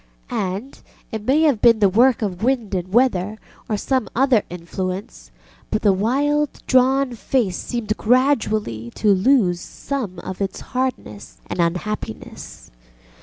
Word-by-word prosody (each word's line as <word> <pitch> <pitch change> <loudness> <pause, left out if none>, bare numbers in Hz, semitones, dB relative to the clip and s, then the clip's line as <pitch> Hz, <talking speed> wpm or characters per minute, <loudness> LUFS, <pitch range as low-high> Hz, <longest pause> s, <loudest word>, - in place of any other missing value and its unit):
And, 195 +8 -4 0.3
it 220 -2 -4
may 285 +4 +4
have 280 -9 +3
been 235 -2 +6
the 205 -2 +4
work 235 +5 +3
of 185 -3 -3
wind 235 -4 0
and 185 0 -3
weather, 215 -3 +2 0.3
or 215 - 0
some 260 +2 -1
other 255 -3 +4
influence, 180 - -5 0.4
but 215 - -1
the 205 -2 +5
wild 285 +9 0
drawn 260 0 +3
face 235 -4 -1
seemed 225 -3 -3
gradually 215 - +1
to 210 -2 +3
lose 190 -3 +3
some 240 -10 -5
of 185 +1 -7
its 195 - -3
hardness 250 - -3
and - - -6
unhappiness. 170 - -4
215 Hz, 135 wpm, -21 LUFS, 185-260 Hz, 0.4 s, been